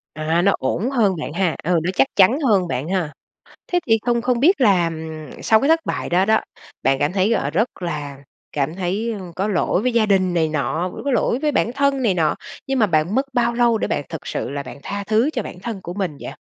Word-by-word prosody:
À, 160 Hz, +3 st, 0 dB
nó 200 Hz, -, +4 dB
ổn 180 Hz, -, -1 dB
hơn 220 Hz, -8 st, +2 dB
bạn 150 Hz, -, -5 dB
ha, 175 Hz, -1 st, 0 dB
ừ, 175 Hz, +1 st, +2 dB
nó 180 Hz, -, 0 dB
chắc 270 Hz, -, +4 dB
chắn 205 Hz, +8 st, +5 dB
hơn 200 Hz, -, +2 dB
bạn 130 Hz, +4 st, -3 dB
ha. 175 Hz, -5 st, -1 dB, 0.6 s
Thế 355 Hz, -, +3 dB
thì 225 Hz, -1 st, +4 dB
không 235 Hz, -1 st, +1 dB
không 245 Hz, -1 st, +1 dB
biết 345 Hz, +4 st, +4 dB
là, 195 Hz, -7 st, +4 dB
ừm, 160 Hz, -1 st, -8 dB
sau 220 Hz, -1 st, +4 dB
cái 275 Hz, -, +1 dB
thất 325 Hz, 0 st, +4 dB
bại -, -, -3 dB
đó 180 Hz, +2 st, +3 dB
đó, 220 Hz, +1 st, +3 dB, 0.4 s
bạn 135 Hz, 0 st, +2 dB
cảm 145 Hz, +4 st, 0 dB
thấy, 200 Hz, +3 st, +2 dB
ờ, 140 Hz, -10 st, 0 dB
rất 190 Hz, +3 st, -1 dB
là 150 Hz, -5 st, -4 dB, 0.4 s
cảm 145 Hz, +3 st, -1 dB
thấy, 195 Hz, +5 st, -2 dB
ưm, 185 Hz, -5 st, -7 dB
có 195 Hz, +5 st, -2 dB
lỗi 190 Hz, 0 st, +1 dB
với 250 Hz, -1 st, +1 dB
gia 225 Hz, -2 st, +3 dB
đình 185 Hz, -3 st, +2 dB
này 160 Hz, -2 st, +2 dB
nọ, 155 Hz, +4 st, -1 dB
vẫn -, -, -8 dB
có 280 Hz, -, 0 dB
lỗi 240 Hz, 0 st, +1 dB
với 300 Hz, -, +1 dB
bản 235 Hz, -3 st, +1 dB
thân 280 Hz, 0 st, +1 dB
này 215 Hz, -6 st, +2 dB
nọ, 155 Hz, -4 st, +1 dB, 0.3 s
nhưng 270 Hz, -1 st, 0 dB
mà 215 Hz, -, +4 dB
bạn 160 Hz, +2 st, +1 dB
mất 265 Hz, +3 st, +1 dB
bao 235 Hz, -1 st, +2 dB
lâu 235 Hz, -1 st, +3 dB
để -, -, -2 dB
bạn -, -, -1 dB
thực -, -, -7 dB
sự -, -, -3 dB
là 140 Hz, 0 st, -4 dB
bạn -, -, -10 dB
tha 200 Hz, 0 st, -4 dB
thứ 225 Hz, +7 st, +2 dB
cho -, -, -2 dB
bản 180 Hz, -, -9 dB
thân 215 Hz, -2 st, -5 dB
của 175 Hz, -, -6 dB
mình 185 Hz, -7 st, -3 dB
vậy? -, -, -6 dB
195 Hz, 255 wpm, -21 LUFS, 165-235 Hz, 0.6 s, chắn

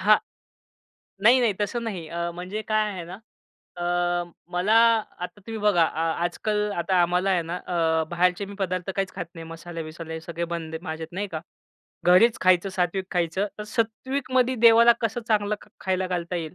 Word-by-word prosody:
हां. 210 Hz, +2 st, +6 dB, 1.1 s
नाही 245 Hz, +4 st, +7 dB
नाही, 230 Hz, -3 st, +3 dB
तसं 220 Hz, +3 st, -1 dB
नाही. 190 Hz, -8 st, -4 dB
अ, 170 Hz, +1 st, -3 dB
म्हणजे 185 Hz, +5 st, -5 dB
काय 215 Hz, -1 st, +2 dB
आहे 180 Hz, -3 st, -6 dB
ना, 175 Hz, -, -8 dB, 0.6 s
अ, 175 Hz, -, -5 dB, 0.7 s
मला 180 Hz, +5 st, +2 dB, 0.4 s
आता 180 Hz, +3 st, -7 dB
तुम्ही 225 Hz, -1 st, -5 dB
बघा, 205 Hz, -5 st, +4 dB
आ 160 Hz, 0 st, -1 dB, 0.2 s
आजकल 210 Hz, +4 st, -1 dB
आता 180 Hz, +1 st, +2 dB
आम्हाला 180 Hz, +3 st, +1 dB
आहे 180 Hz, -2 st, +2 dB
ना, 165 Hz, +2 st, -4 dB
अ, 165 Hz, -3 st, 0 dB
बाहेरचे 180 Hz, +2 st, +1 dB
मी 200 Hz, +1 st, -9 dB
पदार्थ 185 Hz, -1 st, -2 dB
काहीच 195 Hz, -1 st, -1 dB
खात 180 Hz, -3 st, -4 dB
नाही. 165 Hz, -1 st, -8 dB
मसाले-वसाले 165 Hz, -1 st, -7 dB
सगळे 170 Hz, +1 st, -4 dB
बंद 160 Hz, -1 st, -5 dB
आहे. 160 Hz, -, -4 dB
माझ्यात 160 Hz, 0 st, -6 dB
नाही 200 Hz, +3 st, -2 dB
का. 155 Hz, -, -2 dB, 0.6 s
घरीच 185 Hz, +6 st, +5 dB
खायचं, 185 Hz, +1 st, +4 dB
सात्विक 185 Hz, 0 st, -1 dB
खायचं. 175 Hz, +3 st, 0 dB
तर -, -, -4 dB
सात्विकमधे 255 Hz, +2 st, 0 dB
देवाला 230 Hz, +1 st, +8 dB
कसं 230 Hz, +1 st, -1 dB
चांगलं 210 Hz, -1 st, +2 dB
ख -, -, -17 dB
खायला 185 Hz, 0 st, 0 dB
घालता 175 Hz, -1 st, -2 dB
येईल, 160 Hz, -1 st, -5 dB
185 Hz, 175 wpm, -25 LUFS, 170-210 Hz, 1.1 s, देवाला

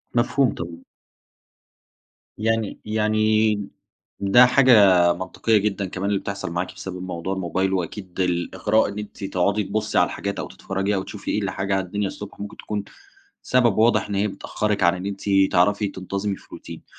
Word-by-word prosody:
مفهوم، 120 Hz, 0 st, +2 dB
طبعًا. 85 Hz, 0 st, -7 dB, 1.6 s
يعني 110 Hz, -1 st, -1 dB
يعني 110 Hz, -1 st, +1 dB, 0.5 s
ده 100 Hz, +6 st, +6 dB
حاجة 105 Hz, -10 st, +6 dB
منطقية 95 Hz, +5 st, 0 dB
جدًا 100 Hz, -1 st, -1 dB
كمان 95 Hz, +2 st, -3 dB
اللي 100 Hz, -, +1 dB
بتحصل 100 Hz, -4 st, -5 dB
معاكِ 90 Hz, +1 st, -3 dB
بسبب 90 Hz, -1 st, -7 dB
موضوع 90 Hz, +1 st, -4 dB
الموبايل، 95 Hz, +1 st, -1 dB
وأكيد 95 Hz, +1 st, -4 dB
الإغراء 95 Hz, +4 st, +1 dB
إن 100 Hz, +1 st, -6 dB
أنتِ 105 Hz, -1 st, -8 dB
تقعدي 100 Hz, +2 st, 0 dB
تبصي 105 Hz, +2 st, -2 dB
على -, -, +6 dB
الحاجات 100 Hz, 0 st, -4 dB
أو -, -, -4 dB
تتفرجي 95 Hz, +2 st, -2 dB
أو 95 Hz, -, -1 dB
تشوفي 105 Hz, -, -6 dB
إيه 105 Hz, -, 0 dB
الحاجة 95 Hz, 0 st, -1 dB
على 95 Hz, -1 st, -1 dB
الدنيا 100 Hz, +2 st, -2 dB
الصبح 100 Hz, +1 st, -9 dB
ممكن 100 Hz, 0 st, -7 dB
تكون 105 Hz, -1 st, -4 dB, 0.6 s
سبب 120 Hz, -5 st, +2 dB
واضح 110 Hz, -2 st, +3 dB
إن 100 Hz, -, -2 dB
هي 100 Hz, +2 st, +1 dB
بتأخرِك 105 Hz, +1 st, -2 dB
عن 85 Hz, +2 st, +4 dB
إن 90 Hz, +1 st, -6 dB
أنتِ 100 Hz, -1 st, -5 dB, 0.3 s
تعرفي 100 Hz, +3 st, +3 dB
تنتظمي 100 Hz, +1 st, -3 dB
في -, -, -18 dB
روتين. -, -, -10 dB
100 Hz, 165 wpm, -23 LUFS, 95-105 Hz, 1.6 s, ده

